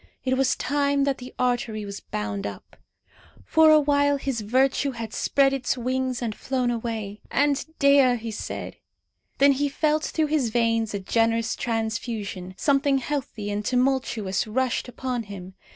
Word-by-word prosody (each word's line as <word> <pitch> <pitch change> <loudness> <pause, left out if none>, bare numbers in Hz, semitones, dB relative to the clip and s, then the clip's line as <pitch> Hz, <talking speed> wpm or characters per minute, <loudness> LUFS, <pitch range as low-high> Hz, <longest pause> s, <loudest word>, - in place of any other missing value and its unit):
It 260 0 +2
was 260 0 +2
time 280 0 +1
that 275 -1 0
the 250 0 -9
artery 240 -4 -1
was 200 0 -6
bound 105 -1 -4
up. 100 -1 -10 0.7
For 320 0 +5
a 310 0 +7
while 285 -1 +2
his 270 -4 -3
virtue 265 +5 +1
had 230 -2 -6
spread 275 -1 +2
its 260 -1 -1
wings 255 0 -1
and 225 -2 -2
flown 255 +1 -1
away. 225 -3 -4
"And 285 -1 +2
Dea!" 280 -3 +5
he 230 -1 -5
said. 210 - -6 0.6
Then 280 +1 +6
he 285 +1 0
felt 305 +2 +1
through 315 - 0
his 270 -7 +2
veins 230 -2 +1
a - - -2
generous 230 +3 +1
transfusion. 220 -5 -3
Something 280 -1 +2
healthy 250 -6 -3
and 205 +1 -2
tumultuous 250 -6 0
rushed 255 +4 -1
upon 250 0 -3
him. 195 -3 -9
245 Hz, 155 wpm, -25 LUFS, 220-275 Hz, 0.7 s, a